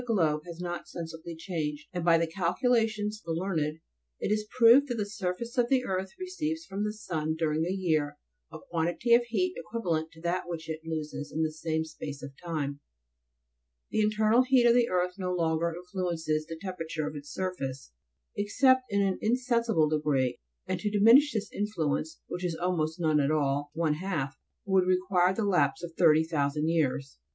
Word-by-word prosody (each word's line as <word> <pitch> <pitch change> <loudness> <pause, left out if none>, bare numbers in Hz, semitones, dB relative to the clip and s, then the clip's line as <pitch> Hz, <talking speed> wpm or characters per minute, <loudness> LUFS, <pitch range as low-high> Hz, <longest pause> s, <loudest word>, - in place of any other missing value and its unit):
13 240 -2 -1
globe 155 -5 +2
has 170 -1 -8
not 175 -1 -4
sensibly 165 0 -7
changed, 160 -4 -4
and 175 -2 -2
by 170 -1 +5
the 165 - +2
calculations 210 +5 0
of - - -32
the - - -1
learned, 160 -5 -1 0.4
it - - -1
is 215 0 0
proved 250 +4 +7
that 245 - -2
the 210 -3 -1
surface 205 +4 -3
of 240 0 +2
the 260 -2 +2
earth 190 0 -2
receives 330 -3 -3
from 200 -4 -3
the 210 - 0
sun 160 -7 -3
during 160 0 0
a - - -1
year 155 -6 0 0.3
a - - -7
quantity 175 +8 +1
of 240 +1 +6
heat 355 +11 0
equivalent 170 -9 -2
to 160 - -16
that 175 +1 -2
which 165 -2 -5
it 160 -1 -4
loses 155 -2 -5
in 160 - 0
the 155 - 0
same 160 0 -2
space 145 -2 -8
of 140 - -6
time; 145 -4 -3 1.1
the 215 - +2
internal 215 +2 +4
heat 255 -1 +4
of 235 - +7
the 240 -1 +3
earth 180 +1 0
no 180 -1 -1
longer 170 -1 +1
influences 170 -3 -2
the 165 - -6
temperature 165 -4 -4
of 150 - -5
its 145 0 -8
surface, 140 - -4 0.4
except 260 +6 +4
in 200 -1 +2
an 190 -1 0
in 225 +3 +3
sensible 235 - +2
degree, 150 -4 0 0.3
and - - -2
to 210 - -1
diminish 230 +8 +6
this 215 -3 -3
influence, 160 -7 -2
which 180 - -6
is 175 -2 -1
almost 165 -3 -1
none 155 -3 +3
at 140 -1 +2
all, 145 -1 0
one 160 -2 +1
half, 155 -5 -3 0.3
would 190 -2 +3
require 185 0 +3
the 205 +2 -1
lapse 185 -2 +2
of 170 -1 -6
30,000 155 -2 +3
years. 140 - 0
175 Hz, 185 wpm, -29 LUFS, 155-210 Hz, 1.1 s, proved